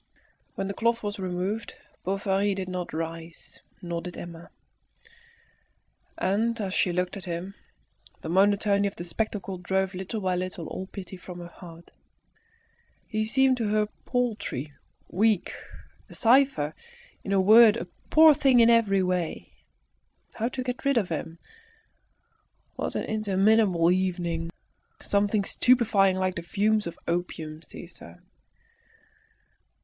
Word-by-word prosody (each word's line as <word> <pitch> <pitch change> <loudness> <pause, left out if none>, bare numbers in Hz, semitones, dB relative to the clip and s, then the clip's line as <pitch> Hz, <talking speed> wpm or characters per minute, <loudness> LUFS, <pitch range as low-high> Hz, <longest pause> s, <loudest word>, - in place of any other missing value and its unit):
When 195 - -3
the 200 - -3
cloth 230 +2 0
was 205 0 -4
removed, 185 +4 -3 0.3
Bovary 195 +1 0
did 190 -1 -4
not 180 -1 -4
rise, 165 +1 -6 0.2
nor 170 -1 -3
did 175 +1 -8
Emma; 170 -1 -9 1.7
and 225 +5 0
as 195 -3 -3
she 180 - +2
looked 180 +2 -2
at 190 - -8
him, 175 +2 -5 0.7
the - - -7
monotony 200 +3 +3
of 200 - -6
the 175 - -6
spectacle 195 0 -3
drove 190 +1 -1
little 190 +4 -4
by 185 -2 0
little 180 -2 -4
all 190 - -6
pity 190 -1 -9
from 180 0 -10
her 175 -1 -8
heart. 170 -1 -13 1.2
He 215 -1 -1
seemed 265 +3 +3
to 230 -3 -1
her 215 0 +2 0.2
paltry, 210 - -2 0.3
weak, 210 0 +1 0.6
a - - -10
cipher 235 - +3 0.5
in 195 - -5
a 195 - +3
word, 215 +3 +7
a - - -4 0.2
poor 315 0 +8
thing 270 -4 +4
in 235 0 +7
every 200 -5 +3
way. 180 -2 -2 0.8
How 230 +2 -1
to 255 0 -4
get 250 0 -4
rid 275 -2 +2
of 205 -6 +1
him? 165 0 -4 1.4
What - - -4
an - - -1
interminable 200 -4 +3
evening! 175 -3 -1 0.5
Something 205 0 +1
stupefying 200 -5 +3
like 185 0 0
the 170 - -5
fumes 210 +3 +1
of 170 - -7
opium 160 -3 -3
seized - - -11
her. - - -13
195 Hz, 135 wpm, -27 LUFS, 175-215 Hz, 1.7 s, poor